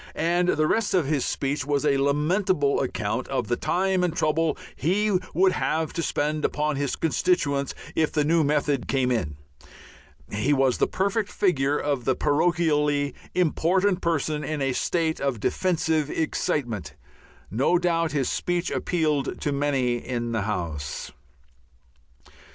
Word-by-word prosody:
And 175 +2 +1
the 155 -2 +2
rest 220 +4 +1
of 175 -5 +3
his 140 -2 0
speech 140 0 -1
was 145 +1 0
a 140 -2 +3
lamentable 150 +2 +1
account 120 -1 -2
of 130 -4 -2
the 120 - +2
time 185 +4 0
and 175 -2 0
trouble 155 0 +1 0.2
he 205 +7 +1 0.2
would 185 +2 +4
have 160 -3 -1
to 170 - -2
spend 150 -1 -1
upon 150 0 0
his 140 -1 -1
constituents 140 -2 0 0.2
if 160 -1 +1
the 150 - +1
new 160 +2 +3
method 145 -2 0
came 130 -2 +1
in. 75 -12 -1 1.0
He 105 +8 +1
was 135 -2 +2
the - - +3
perfect 200 +2 -1
figure 145 -7 +1
of 140 -5 -2
the 130 - +2
parochially 150 -3 +1 0.2
important 185 +2 +2
person 155 -2 -1
in 155 -1 -3
a 135 -2 0
state 160 +3 0
of 135 -5 -1
defensive 160 - 0
excitement. 120 - -2 0.6
No 135 - +2
doubt 165 -2 +1
his 140 -3 0
speech 175 0 -1
appealed 155 -5 -1
to 145 - 0
many 140 -4 +1
in 120 -1 -3
the 110 -2 0
House. 85 -8 -4
150 Hz, 145 wpm, -25 LUFS, 135-170 Hz, 1.0 s, would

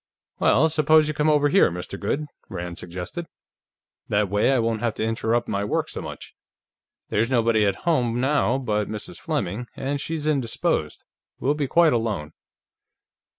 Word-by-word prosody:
"Well, 155 +5 +4
suppose 155 0 +4
you 155 - -1
come 150 0 +1
over 145 -1 +4
here, 190 +7 +5
Mr. 90 +3 -6
Goode," 140 +9 -1 0.2
Rand 90 -2 -5
suggested. 90 - -6 0.8
"That 105 -1 +1
way, 105 +6 +2
I 135 - +3
won't 115 -2 0
have 115 -2 -1
to - - -2
interrupt 115 +1 0
my 100 0 -1
work 105 - -1
so - - -5
much. - - -9 0.8
There's 115 +3 +1
nobody 115 -4 +3
at 100 - -3
home 125 -8 +1
now 135 -1 +2
but 105 -6 -1
Mrs. 110 -1 -6
Fleming, 105 +8 -3
and 135 - -4
as 145 - -2
she's 160 -1 -3
indisposed, 135 -7 -1 0.3
we'll 140 - +1
be 150 -2 -2
quite 165 +1 +4
alone." 110 -10 -2
120 Hz, 165 wpm, -24 LUFS, 105-150 Hz, 0.8 s, here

